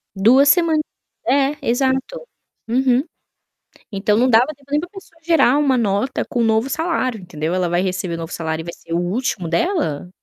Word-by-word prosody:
2 255 +9 +5
semanas, 325 -2 +3 0.5
é 280 +3 +2
exato. 265 - 0 0.5
Uhum. 255 +2 +2 0.9
Então 205 +1 +1
não 250 +2 +3
dava 235 +2 +5
tempo 280 0 -25
nem 295 +1 +2
da 350 - -7
pessoa 380 -4 -14
gerar 315 -6 +4
uma 275 -3 +2
nota 215 +4 -1
com 240 - -2
um - - +2
novo 225 +3 +1
salário, 285 - -1
entendeu. 165 -2 -4
Ela 185 -1 0
vai 175 +1 +1
receber 185 -2 -2
o - - -5
novo 165 +1 -7
salário 160 -1 -3
e - - -13
vai 170 - -6
ser 165 - -12
o 170 - +1
último 185 0 -2
dela? 175 - -1
245 Hz, 190 wpm, -19 LUFS, 180-280 Hz, 0.9 s, 2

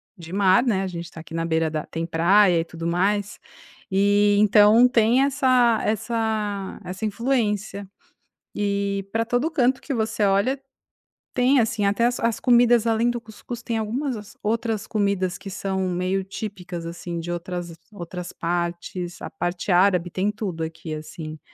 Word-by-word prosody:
de 170 -2 -11
mar, 190 0 +4
né, 205 -7 +1
a - - -2
gente 170 -1 -6
está 165 -1 -10
aqui 160 0 -13
na 165 0 -1
beira 160 -1 0
da 155 -1 -3
tem 165 0 -4
praia 175 +2 +4
e - - 0
tudo 165 0 -8
mais. 195 +4 0 0.5
E 205 +1 +4
então 210 +3 +6
tem 240 +1 +3
essa 255 -4 +3
essa 215 -2 -2
essa 185 +4 -7
influência. 210 -3 -1 0.6
E 200 -1 -1
pra 225 0 +2
todo 245 +7 0
canto 260 -4 +1
que 280 - -4
você 220 -2 -1
olha, 200 +8 +1 0.7
tem 255 +2 +4
assim, 220 -2 0
até 205 +4 +2
as 245 0 0
as 230 -1 0
comidas, 240 -2 +4
além 230 +1 +2
do 240 - -2
cuscuz, 230 +2 -9
tem 230 -1 -2
algumas 245 +5 -2
as 210 0 -11
outras 220 -1 -1
comidas 200 -4 0
que 195 - -9
são 190 -1 -2
meio 185 +2 -1
típicas, 185 -4 -6
assim, 170 0 -5
de 175 +1 -5
outras 175 0 -5 0.2
outras 180 -2 -7
partes, 175 +1 -3
a - - -6
parte 175 +2 -3
árabe 180 -1 +3
tem 190 +4 0
tudo 190 -6 -4
aqui, 160 0 -6
assim, 155 0 -7
200 Hz, 165 wpm, -23 LUFS, 175-225 Hz, 0.7 s, então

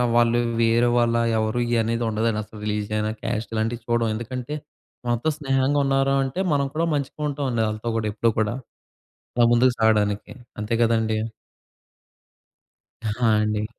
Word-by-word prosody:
వాళ్ళు 120 0 +4 0.2
వేరే 115 +1 +3
వాళ్ళ 120 -1 +3 0.2
ఎవరు 110 +2 0 0.2
అనేది 115 +1 -1
ఉండదండి 110 0 0
అసలు. 105 0 -13
రిలీజియన్ 105 0 -1
అయినా 105 0 -1
క్యాస్ట్ 115 -1 -3
ఇలాంటివి 115 +2 -1
చూడం. 120 -1 +1
ఎందుకంటే 125 +4 -5 0.5
మనతో 120 +6 +1
స్నేహంగా 135 -1 +1
ఉన్నారంటే, 135 +1 +1
మనం 140 -1 +2
కూడా 165 +2 +1
మంచిగా 145 +1 -3
ఉంటాములే 135 -5 -1
వాళ్ళతో 110 +2 -3
కూడా 110 - -1
ఎప్పుడూ 115 +2 +2
కూడా. 110 +1 +1 0.8
అలా 120 - +5
ముందుకు 125 +2 +4
సాగడానికి. 105 -2 +2 0.3
అంతే 105 +2 -1
గదండీ! 110 -1 +2 1.9
ఆ! - - -2 0.4
అండి. 105 0 -1
115 Hz, 135 wpm, -24 LUFS, 110-130 Hz, 1.9 s, అలా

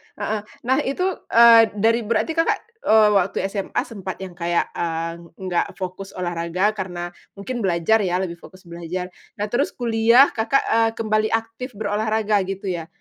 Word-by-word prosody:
heeh. 220 - -2 0.2
Nah 260 +3 +2
itu, 275 +7 -1 0.2
eee, 230 -1 +7
dari 225 +3 +2
berarti 230 +7 0
Kakak, 330 0 +1 0.2
eee, 215 - +5
waktu 195 -2 +1
SMA 200 -2 -2
sempat 195 -4 -7
yang 185 - -7
kayak, 175 0 -1
eee, 165 0 -3 0.2
enggak 185 -2 -2
fokus 190 +1 -7
olahraga 175 +3 -1
karena 175 -4 -5 0.2
mungkin 240 +5 -5
belajar 190 +2 +2
ya, 185 -1 0
lebih 170 -2 -6
fokus 185 +1 -15
belajar. 175 +1 -6 0.2
Nah 210 0 -4
terus 270 +5 0
kuliah 235 +2 +4
Kakak, 230 +5 +1
eee, 225 0 +2
kembali 215 -1 +1
aktif 225 +2 -3
berolahraga 215 0 0
gitu 195 -1 -4
ya. 165 -2 -5
205 Hz, 155 wpm, -22 LUFS, 180-225 Hz, 0.2 s, eee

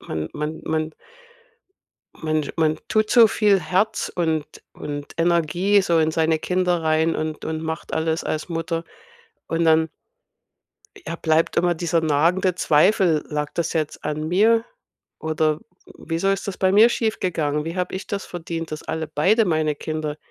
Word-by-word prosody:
man 80 0 -4
man 150 +1 -4
man 155 0 -1 1.2
man 155 -2 -2
man 155 -2 +1
tut 215 0 +1
so 235 -2 +8
viel 210 -3 +3
Herz 205 +6 0
und 160 -3 0 0.3
und 145 -1 -7
Energie 170 +4 +3
so 170 -3 +2
in 160 0 +2
seine 160 0 +1
Kinder 180 -1 0
rein 160 +1 +2
und 155 -1 -4
und 160 0 -3
macht 160 0 -5
alles 160 0 -1
als 155 +3 -3
Mutter 165 0 -3 0.6
und 165 0 0
dann 160 0 +4 1.2
ja, 165 - -4
bleibt 160 0 +1
immer 175 0 +3
dieser 165 0 0
nagende 170 +4 +2
Zweifel: 165 0 +3
„Lag 150 -1 -2
das 170 - -1
jetzt 155 -2 -3
an 155 +1 -2
mir 225 +6 +3 0.5
oder 155 -1 0
w - - -31 0.5
wieso 165 +4 0
ist 195 +1 -2
das 190 - -5
bei 190 0 +2
mir 215 +4 +7
schiefgegangen? 165 -10 -1
Wie 165 +3 -5
habe 180 0 -2
ich 190 - -5
das 200 -1 -4
verdient, 165 -2 -6
dass 155 - -5
alle 160 0 -3
beide 205 +10 +3
meine 155 -4 +1
Kinder 155 -1 -4
165 Hz, 160 wpm, -22 LUFS, 155-180 Hz, 1.2 s, so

